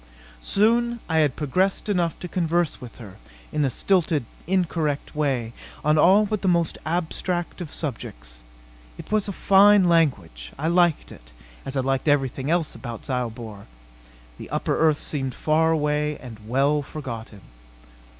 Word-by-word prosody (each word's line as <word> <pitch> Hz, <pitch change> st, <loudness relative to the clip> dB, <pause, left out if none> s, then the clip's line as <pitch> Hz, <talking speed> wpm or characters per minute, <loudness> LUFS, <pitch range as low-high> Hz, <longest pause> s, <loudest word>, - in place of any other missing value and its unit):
Soon 235 Hz, -, +2 dB
I 160 Hz, -1 st, +1 dB
had 150 Hz, -4 st, +2 dB
progressed 185 Hz, +9 st, 0 dB
enough 175 Hz, -5 st, 0 dB
to 180 Hz, -, -5 dB
converse 170 Hz, -2 st, -1 dB
with 125 Hz, -2 st, -10 dB
her 105 Hz, -5 st, -12 dB, 0.3 s
in 150 Hz, -, 0 dB
a 135 Hz, -, +2 dB
stilted, 165 Hz, -2 st, +1 dB, 0.2 s
incorrect 165 Hz, -7 st, -1 dB
way 130 Hz, -6 st, -1 dB, 0.3 s
on 155 Hz, 0 st, +4 dB
all 195 Hz, +7 st, +6 dB
but 215 Hz, -1 st, -2 dB
the 195 Hz, -, -1 dB
most 170 Hz, -3 st, +1 dB
abstract 175 Hz, +2 st, -2 dB
of 165 Hz, -, -6 dB
subjects. -, -, -6 dB, 0.6 s
It -, -, -11 dB
was 215 Hz, -1 st, +1 dB
a -, -, -2 dB
fine 200 Hz, 0 st, +5 dB
language. 135 Hz, -, 0 dB
I 155 Hz, +4 st, -1 dB
liked 175 Hz, -2 st, +2 dB
it, -, -, -14 dB, 0.4 s
as 135 Hz, 0 st, -3 dB
I -, -, +2 dB
liked 135 Hz, +2 st, -1 dB
everything 135 Hz, -1 st, +1 dB
else 170 Hz, -2 st, 0 dB
about 120 Hz, -4 st, -8 dB
Zyobor. 115 Hz, -5 st, -5 dB, 0.7 s
The -, -, -9 dB
upper -, -, -1 dB
earth 155 Hz, -2 st, +3 dB
seemed 135 Hz, -5 st, -4 dB
far 160 Hz, +1 st, +2 dB
away 150 Hz, -1 st, 0 dB
and 120 Hz, -4 st, -10 dB
well 140 Hz, +5 st, +2 dB
forgotten. 115 Hz, -8 st, -8 dB
150 Hz, 150 wpm, -24 LUFS, 130-175 Hz, 0.7 s, all